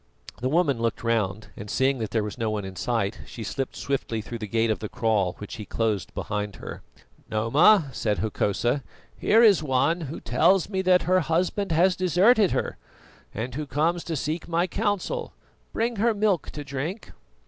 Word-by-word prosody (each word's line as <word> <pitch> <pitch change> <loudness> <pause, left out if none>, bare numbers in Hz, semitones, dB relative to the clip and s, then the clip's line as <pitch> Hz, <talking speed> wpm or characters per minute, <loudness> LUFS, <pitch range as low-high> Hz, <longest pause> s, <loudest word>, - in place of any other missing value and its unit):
The 130 - -1
woman 150 -5 +2
looked 115 0 -1
round, 110 -3 -1
and 100 - -8
seeing 130 +2 +1
that 110 -2 -3
there 110 -2 0
was 105 -1 -5
no 115 -3 -1
one 105 -2 -2
in 95 -1 -8
sight, 110 -1 -1
she 115 - -7
slipped 135 +6 -4
swiftly 135 -5 -2
through 115 +2 -6
the 105 - -5
gate 115 +2 +1
of 110 - -1
the 110 - -5
kraal, 105 -6 +1
which 105 +2 -8
he 110 - -6
closed 110 -4 -1
behind 105 -1 -3
her. - - -8 0.5
"Noma," 145 - +4
said 105 -4 -1
Hokosa, 110 +5 0 0.3
"here 225 +2 +4
is 205 -7 +6
one 155 +4 +1
who 155 - -6
tells 190 -2 +2
me 190 -2 -1
that 185 -1 +4
her 185 +1 +3
husband 180 +4 0
has 180 +3 +4
deserted 185 - +4
her, - - -2 0.5
and 120 +3 -4
who 150 +3 -4
comes 165 +5 0
to 165 - -3
seek 155 +4 -3
my 170 +1 +1
counsel. 205 - -2 0.4
Bring 230 0 -1
her 225 +2 +2
milk 205 -4 +1
to 145 - -7
drink." 145 +9 -5
140 Hz, 185 wpm, -25 LUFS, 110-180 Hz, 0.5 s, is